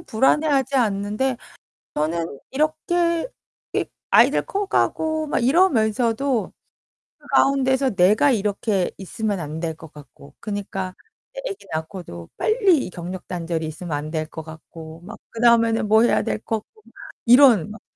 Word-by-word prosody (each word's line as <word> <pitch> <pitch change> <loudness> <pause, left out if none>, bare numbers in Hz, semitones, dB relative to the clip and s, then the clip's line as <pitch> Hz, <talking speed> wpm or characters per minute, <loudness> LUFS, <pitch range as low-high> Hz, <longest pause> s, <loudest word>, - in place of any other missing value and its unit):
불안해하지 275 +3 +1
않는데 215 +2 0 0.6
저는 160 -1 -2
이렇게 330 - 0 0.5
이 - - +1 0.3
아이들 - - +5
커가고 320 -6 0
막 300 - -1
이러면서도 245 - +2 0.6
그 - - -20
가운데서 265 -3 +2
내가 200 +9 +4
이렇게 205 -3 0
있으면 200 +1 -3
안 155 -1 -5
될 165 -1 -3
것 160 -1 -13
같고 145 -1 -15
그니까 195 -3 -4 0.4
애 - - -5
애기 395 - -8
낳고도 155 - -6
빨리 405 - +2
이 - - -7
경력 180 +1 -7
단절이 165 -2 -3
있으면 160 +2 -7
안 150 +1 -6
될 155 -1 -2
거 160 - -8
같고, 160 0 -11
막 185 - -10
그다음에는 230 -1 +3
뭐 220 +2 +5
해야 240 - +3
될 - - -2
거 225 0 -2
같고, 435 - -27 0.4
이런 240 - +6
막 215 - -11
215 Hz, 285 characters per minute, -22 LUFS, 170-270 Hz, 0.6 s, 이런